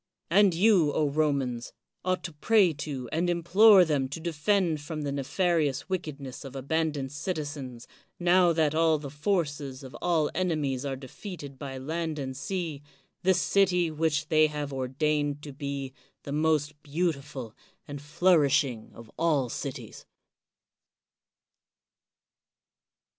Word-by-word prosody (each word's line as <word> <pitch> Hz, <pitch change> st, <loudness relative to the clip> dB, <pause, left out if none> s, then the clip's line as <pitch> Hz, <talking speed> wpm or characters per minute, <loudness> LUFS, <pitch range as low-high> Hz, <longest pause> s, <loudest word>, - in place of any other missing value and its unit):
And 195 Hz, -1 st, +5 dB
you, 180 Hz, -5 st, +4 dB, 0.2 s
Romans, 140 Hz, -5 st, -1 dB, 0.3 s
ought 185 Hz, 0 st, -1 dB
to 170 Hz, -, -6 dB
pray 190 Hz, +3 st, +3 dB
to 140 Hz, -4 st, -5 dB
and 175 Hz, +2 st, 0 dB
implore 185 Hz, +3 st, +6 dB
them 140 Hz, -4 st, 0 dB
to 145 Hz, -, -5 dB
defend 170 Hz, 0 st, 0 dB
from 155 Hz, 0 st, -5 dB
the 140 Hz, -, -2 dB
nefarious 150 Hz, +1 st, 0 dB
wickedness 145 Hz, -8 st, -5 dB
of 135 Hz, -1 st, -9 dB
abandoned 145 Hz, 0 st, -1 dB
citizens, 145 Hz, -6 st, -5 dB, 0.3 s
now 175 Hz, 0 st, +4 dB
that 160 Hz, -2 st, +2 dB
all 160 Hz, 0 st, +3 dB
the 145 Hz, -2 st, -8 dB
forces 145 Hz, -5 st, -2 dB
of 130 Hz, 0 st, -10 dB
all 160 Hz, -4 st, +1 dB
enemies 150 Hz, -7 st, -1 dB
are 135 Hz, -1 st, -2 dB
defeated 140 Hz, -, -9 dB
by 135 Hz, -2 st, -6 dB
land 160 Hz, +3 st, -3 dB
and 130 Hz, -2 st, -4 dB
sea, 160 Hz, 0 st, -4 dB, 0.4 s
this 185 Hz, 0 st, +3 dB
city 180 Hz, -4 st, +2 dB
which 155 Hz, -1 st, 0 dB
they 155 Hz, 0 st, +5 dB
have 150 Hz, -2 st, -5 dB
ordained 145 Hz, +2 st, -1 dB
to 145 Hz, -, -8 dB
be 140 Hz, -1 st, -5 dB, 0.3 s
the 140 Hz, -, -7 dB
most 150 Hz, -1 st, 0 dB
beautiful 140 Hz, -6 st, -3 dB, 0.3 s
and 145 Hz, -1 st, -7 dB
flourishing 145 Hz, -6 st, +2 dB
of 115 Hz, -1 st, -13 dB
all 150 Hz, -7 st, +2 dB
cities. -, -, -7 dB
150 Hz, 125 wpm, -28 LUFS, 140-170 Hz, 0.4 s, implore